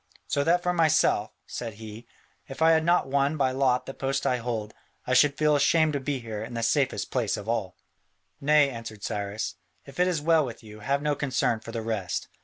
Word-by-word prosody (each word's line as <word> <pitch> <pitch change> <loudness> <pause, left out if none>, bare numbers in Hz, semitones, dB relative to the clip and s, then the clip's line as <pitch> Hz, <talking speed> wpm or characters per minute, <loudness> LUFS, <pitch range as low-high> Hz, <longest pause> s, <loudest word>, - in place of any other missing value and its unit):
So 140 0 +1
that 175 +2 +3
for 180 - +1
myself," 165 -4 +3 0.2
said 115 -3 -6
he, 110 +2 -10 0.4
"if 135 - -9
I 165 - +6
had 160 0 +3
not 175 -1 +3
won 140 +3 +1
by 135 -3 +2
lot 130 -1 +1
the 135 - -6
post 135 +1 -2
I 125 - +2
hold, 115 -3 -4 0.3
I 125 - 0
should 140 +2 +4
feel 150 -1 +3
ashamed 155 +2 +3
to 140 - 0
be 140 +1 -2
here 110 -3 -6
in 120 +2 -7
the 115 - -2
safest 135 +3 0
place 120 -5 0
of 105 - -8
all." 110 -6 -2 0.7
"Nay," 145 0 +4
answered 115 -3 -8
Cyrus, 100 -1 -3 0.3
"if 140 +2 -12
it 180 - +4
is 175 -4 0
well 160 +1 +3
with 120 -3 -7
you, 105 -1 -12
have 140 +6 -1
no 150 -1 +1
concern 130 -5 0
for 115 - -9
the 115 -1 -4
rest. 110 -5 -3
130 Hz, 215 wpm, -27 LUFS, 115-145 Hz, 0.7 s, I